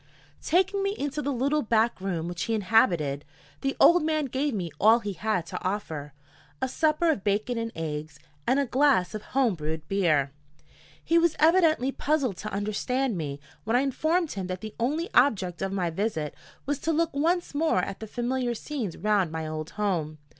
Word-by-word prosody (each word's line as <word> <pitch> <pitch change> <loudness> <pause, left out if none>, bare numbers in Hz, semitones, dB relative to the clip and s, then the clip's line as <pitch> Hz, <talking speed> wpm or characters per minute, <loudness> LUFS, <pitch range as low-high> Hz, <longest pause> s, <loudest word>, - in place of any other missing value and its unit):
Taking 380 +4 +2
me 395 +1 0
into 290 +1 -2
the 285 - -1
little 280 +4 +1
back 225 -3 +1
room 175 -4 -2
which 175 0 -3
he 225 - 0
inhabited, 175 -9 +2 0.4
the 270 0 -1
old 345 +1 +7
man 310 -1 0
gave 275 +3 -1
me 180 -8 -3
all 220 +3 +6
he 205 -4 -4
had 185 -1 -1
to 160 - -6
offer 160 -7 -3 0.5
a - - 0
supper 315 +4 +2
of 205 -11 -3
bacon 215 +4 0
and 230 0 -3
eggs 155 -2 -5 0.3
and 260 +3 +3
a 280 - +2
glass 260 -8 +2
of 215 - -4 0.2
home 250 -6 +4
brewed 155 -1 -5
beer. 155 -8 +2 0.7
He 335 +1 +3
was 335 -1 +2
evidently 315 -5 +4
puzzled 275 - 0
to 215 - -6
understand 215 +5 -1
me 145 -4 -4 0.2
when 225 +2 0
I 250 - +4
informed 315 +5 0
him 190 -3 -4
that 185 0 -5
the 215 -1 -7
only 300 +9 0
object 195 -10 +2
of 195 0 -1
my 180 -3 -1
visit 160 -5 -2 0.3
was 285 0 -1
to 325 - -1
look 330 0 +1
once 335 +5 0
more 290 - +2
at 195 - -5
the 220 - -7
familiar 245 +1 -1
scenes 230 - -4
round 205 -5 +1
my 160 0 -4
old 155 0 -5
home. 170 -7 -1
225 Hz, 190 wpm, -27 LUFS, 180-285 Hz, 0.7 s, old